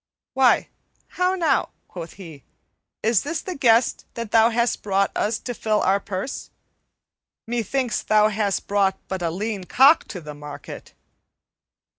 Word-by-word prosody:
"Why, 260 -2 +3 0.4
how 365 +1 0
now," 340 -3 +1 0.2
quoth 170 -2 -8
he, 160 -8 -12 0.6
"is 220 -1 +3
this 315 +3 -3
the 370 - -5
guest 235 -5 +3
that 230 -2 -5
thou 225 0 +5
hast 235 +1 0
brought 195 -1 +1
us 215 +1 0
to 245 - -4
fill 215 -1 0
our 195 +2 +2
purse? 200 +6 -5 1.0
Methinks 240 +1 -1
thou 215 0 +3
hast 205 -2 -1
brought 195 -1 +1
but 190 -1 -4
a 170 - 0
lean 200 +2 -4
cock 275 - +5
to 185 - -7
the 150 -3 -9
market." 145 0 -10
215 Hz, 145 wpm, -23 LUFS, 190-240 Hz, 1.0 s, thou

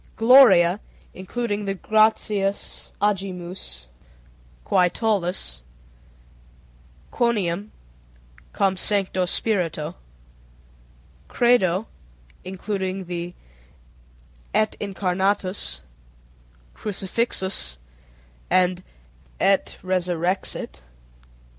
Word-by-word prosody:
_ - - -32
Gloria 225 -7 +7 0.3
(including 205 +2 -3
the 195 0 -2
Gratias 210 -1 +1
agimus, 185 - -2 0.8
Qui 180 - +3
tollis, 180 - -1 1.5
Quoniam, 205 -4 0 0.8
Cum 190 -1 +1
Sancto 190 -2 +1
Spirito). 170 -7 0 1.3
Credo 220 -5 +3 0.6
(including 190 0 -4
the 175 0 -5 1.2
Et 215 0 +2
Incarnatus, 190 - -1 0.9
Crucifixus, 190 - -2 0.7
and 185 0 +3 0.6
Et 195 0 +2
Resurrexit). 180 0 -1
190 Hz, 60 wpm, -23 LUFS, 180-210 Hz, 1.5 s, Gloria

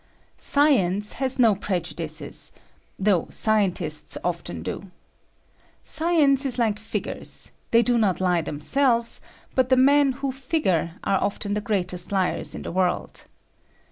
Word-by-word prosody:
Science 210 -9 +3
has 265 -1 -1
no 230 -4 +5
prejudices 170 -5 -4 0.2
— - - -38
though 190 -6 +3
scientists 180 -8 0
often 170 - -4
do. 185 - -6 0.9
Science 310 -4 +2
is 260 -3 -1
like 220 -4 +1
figures: 220 +1 -4 0.2
they 230 0 +4
do 240 -1 +2
not 200 -5 +1
lie 180 -2 +2
themselves, 235 - +1 0.3
but 255 -1 +2
the 260 - +4
men 280 +1 +5
who 270 +1 -3
figure 250 - -1
are 195 - +1
often 200 0 -2
the 210 - -1
greatest 180 -5 -1
liars 190 -2 0
in - - -7
the - - -5
world. 180 0 -1
210 Hz, 135 wpm, -24 LUFS, 180-260 Hz, 0.9 s, no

